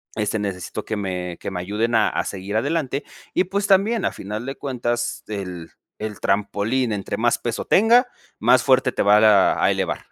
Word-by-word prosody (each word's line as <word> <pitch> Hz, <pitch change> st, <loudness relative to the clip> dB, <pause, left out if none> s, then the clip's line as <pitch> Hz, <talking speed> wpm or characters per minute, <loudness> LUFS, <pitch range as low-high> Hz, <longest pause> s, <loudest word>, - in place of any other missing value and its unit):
este, 105 Hz, 0 st, -1 dB
necesito 95 Hz, -4 st, -4 dB
que 110 Hz, -, -3 dB
me 90 Hz, -3 st, -4 dB
que -, -, -4 dB
me 90 Hz, -, -4 dB
ayuden 105 Hz, +6 st, -1 dB
a 110 Hz, -, +4 dB
a -, -, -1 dB
seguir 100 Hz, +2 st, -5 dB
adelante". 140 Hz, +3 st, -1 dB, 0.3 s
Y, -, -, +3 dB
pues, 200 Hz, +2 st, -2 dB
también, 200 Hz, +2 st, +3 dB
a -, -, 0 dB
final 105 Hz, +4 st, -6 dB
de 135 Hz, +1 st, -5 dB
cuentas, 120 Hz, -3 st, -3 dB
el 90 Hz, -5 st, -6 dB, 0.3 s
el 105 Hz, -1 st, -6 dB
trampolín 105 Hz, +4 st, 0 dB
entre 100 Hz, -2 st, -4 dB
más 120 Hz, +1 st, +1 dB
peso 120 Hz, -1 st, -3 dB
tenga, 235 Hz, +5 st, +5 dB, 0.3 s
más 125 Hz, +3 st, +4 dB
fuerte 130 Hz, -2 st, +3 dB
te -, -, -1 dB
va 105 Hz, +1 st, +6 dB
ra 105 Hz, -3 st, +4 dB
a -, -, +4 dB
elevar. -, -, -2 dB
110 Hz, 190 wpm, -22 LUFS, 100-130 Hz, 0.3 s, va